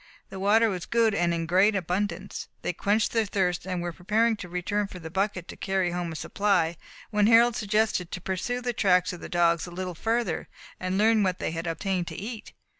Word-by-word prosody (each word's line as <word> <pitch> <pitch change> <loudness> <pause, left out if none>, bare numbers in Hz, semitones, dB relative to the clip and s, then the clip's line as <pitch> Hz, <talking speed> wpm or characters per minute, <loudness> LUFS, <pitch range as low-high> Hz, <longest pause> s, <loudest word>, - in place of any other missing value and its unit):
The 190 - -6
water 215 +4 +4
was 185 -3 -4
good, 230 -2 +3
and 175 -3 +1
in 165 -1 -1
great 190 +5 +4
abundance. 195 +3 -2 0.2
They - - -1
quenched 210 +1 +1
their 225 -2 +1
thirst, 180 -2 -1
and 180 -2 -2
were 175 -1 -3
preparing 220 +6 +1
to 180 -3 -8
return 195 +4 -1
for 185 - -10
the 160 -2 -8
bucket 190 -1 -1
to - - -7
carry 190 -2 0
home 175 -1 -3
a - - -6
supply, 175 -2 +1 0.4
when 210 -1 +3
Harold 235 +1 +6
suggested 210 -4 0
to - - -4
pursue 190 +7 -2
the 245 0 -2
tracks 180 -4 +3
of 175 - -9
the - - -7
dogs 170 -1 +2
a - - -7
little 180 +1 -4
further, 230 +7 -1 0.3
and 185 +1 -1
learn 220 +1 +4
what 185 -2 +1
they - - -2
had 165 +1 -4
obtained 175 +2 -1
to - - -6
eat. 220 +2 -7
190 Hz, 215 wpm, -27 LUFS, 175-215 Hz, 0.4 s, Harold